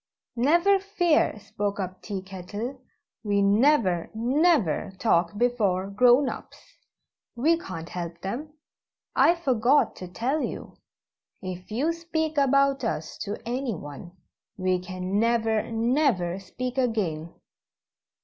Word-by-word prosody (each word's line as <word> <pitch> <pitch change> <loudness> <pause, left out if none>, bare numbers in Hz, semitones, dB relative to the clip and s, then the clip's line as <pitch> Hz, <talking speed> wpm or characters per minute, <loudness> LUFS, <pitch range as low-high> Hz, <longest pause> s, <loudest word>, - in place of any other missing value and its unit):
"Never 340 +11 +4
fear," 355 - +1
spoke 205 0 -4
up 185 -1 -5
Tea 195 -3 -5
Kettle; 205 +7 -6 0.4
"we 200 -2 +2
never, 205 - +3
never 240 - +2
talk 180 -3 +1
before 205 -6 +1
'grown 250 +6 +5
ups' - - -9 0.6
we 300 +8 +3
can't 185 - -7
help 170 -1 -6
them. 255 +11 -5 0.6
I 340 - +5
forgot 265 -4 +2
to 185 - -7
tell 245 - -1
you - - -5 0.7
if 185 -1 -6
you 275 +10 0
speak 320 -2 -2
about 275 0 +3
us 160 -8 -3
to 205 0 -4
anyone, 180 - -4 0.4
we 185 -1 +1
can 185 +2 -3
never, 225 -1 +1
never 225 - +1
speak 250 +7 -4
again." 180 -10 -1
225 Hz, 115 wpm, -26 LUFS, 185-275 Hz, 0.7 s, grown